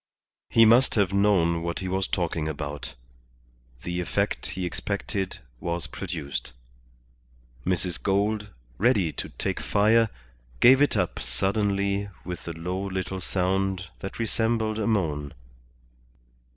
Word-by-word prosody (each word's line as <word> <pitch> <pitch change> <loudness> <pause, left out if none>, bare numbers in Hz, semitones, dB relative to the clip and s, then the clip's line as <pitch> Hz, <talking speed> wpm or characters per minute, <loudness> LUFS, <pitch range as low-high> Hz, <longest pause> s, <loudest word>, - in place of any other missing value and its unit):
He 115 - +6
must 120 +4 +5
have 100 -3 +2
known 95 -5 +3
what 85 0 -2
he 95 +1 -3
was 95 +1 0
talking 85 -3 -1
about. 75 -3 -5 0.9
The 90 0 -2
effect 100 +4 -1
he 95 -1 -3
expected 95 +2 -2 0.2
was 85 -2 -2
produced. 75 -4 -5 1.1
Mrs. 90 -1 0
Gould, 105 +2 +1 0.3
ready 105 -7 +3
to - - -5
take - - -3
fire, 110 +2 +3 0.5
gave 130 +3 +7
it 145 -6 +3
up 90 -3 0
suddenly 100 - 0 0.2
with 90 -1 -6
a 85 - -3
low 90 +4 -3
little 95 -1 -3
sound 95 0 0
that 95 - -6
resembled 110 -1 0
a 105 - 0
moan. 75 -9 0
95 Hz, 125 wpm, -26 LUFS, 85-105 Hz, 1.1 s, gave